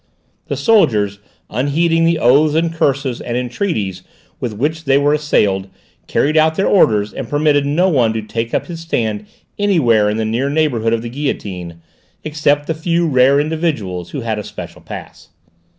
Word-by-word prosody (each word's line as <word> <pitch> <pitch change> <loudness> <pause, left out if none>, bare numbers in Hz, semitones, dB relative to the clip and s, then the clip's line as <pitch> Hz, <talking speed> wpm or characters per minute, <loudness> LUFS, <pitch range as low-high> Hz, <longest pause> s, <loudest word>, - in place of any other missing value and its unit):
The - - -3
soldiers, 105 - +2 0.3
unheeding 165 +7 +1
the 165 0 +2
oaths 150 +3 +4
and 165 0 +1
curses 135 -5 0
and 120 0 -3
entreaties 120 - -2 0.4
with 120 - -3
which 155 +7 -2
they 135 0 +4
were 145 +1 +2
assailed, 100 -11 +1 0.4
carried 150 +2 +1
out 160 0 +4
their 195 - +1
orders 105 - +3
and 130 -4 -6
permitted 145 -1 +2
no 170 +6 +2
one 125 -10 +2
to 110 -1 -3
take 115 +2 -4
up - - -1
his 170 -2 -7
stand 110 -10 -2 0.3
anywhere 125 - +3
in 105 - -1
the 110 - -1
near 120 +5 -1
neighbourhood 135 -7 +1
of 115 0 -1
the 120 - -5
guillotine, 95 - -5 0.4
except 145 -1 0
the 160 - -1
few 170 +2 0
rare 135 0 +4
individuals 145 - -2
who 140 - -5
had 110 -2 -2
a - - -5
special - - -9
pass. - - -10
140 Hz, 170 wpm, -17 LUFS, 110-155 Hz, 0.4 s, oaths